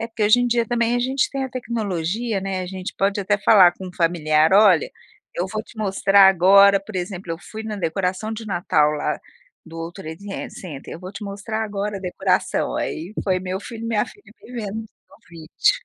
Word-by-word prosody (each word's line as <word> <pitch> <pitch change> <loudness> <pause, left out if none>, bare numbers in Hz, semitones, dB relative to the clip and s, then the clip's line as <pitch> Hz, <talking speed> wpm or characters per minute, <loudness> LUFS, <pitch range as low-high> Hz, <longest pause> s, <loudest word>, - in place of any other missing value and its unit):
É 225 - -2
porque, 225 -2 -2
hoje 215 +4 +5
em 245 - +2
dia, 235 -1 +1
também, 235 0 +1
a - - +1
gente 260 +2 0
tem 270 -1 -2
a - - -4
tecnologia, 220 -3 -2
né, 190 -1 -3
a 185 - -4
gente 185 0 -6
pode, 200 +1 +1
até, 205 +1 +1
falar 195 -4 +6
com 190 +1 -9
um - - -11
familiar: 160 -2 +2
"Olha, 195 -5 +5 0.4
eu 175 - -1
vou 215 +3 -4
te 230 - -18
mostrar 195 -1 +5
agora, 195 +2 +6
por 195 0 -8
exemplo, 180 0 -5
eu 165 - -5
fui 220 +5 -9
na 215 -1 -5
decoração 185 +4 -2
de 225 0 -6
Natal, 175 -6 +2
lá, 150 0 -2 0.5
do 165 0 -11
World 165 +1 -6
Trade 190 +5 -7
Center, 150 -7 -9
eu - - -8
vou 185 +1 -8
te 210 - -8
mostrar, 205 +2 -4
agora, 205 -1 -3
a - - -13
decoração". 180 - 0
Aí, 175 +7 -4
foi 185 -2 +1
meu 185 +1 -4
filho 230 +1 -8
e - - -3
minha 215 -2 +1
filha 410 - -16 0.2
me 245 - -13
vendo 220 -3 -4
no 220 - -16
vídeo. 170 - -1
195 Hz, 215 wpm, -22 LUFS, 180-220 Hz, 0.5 s, falar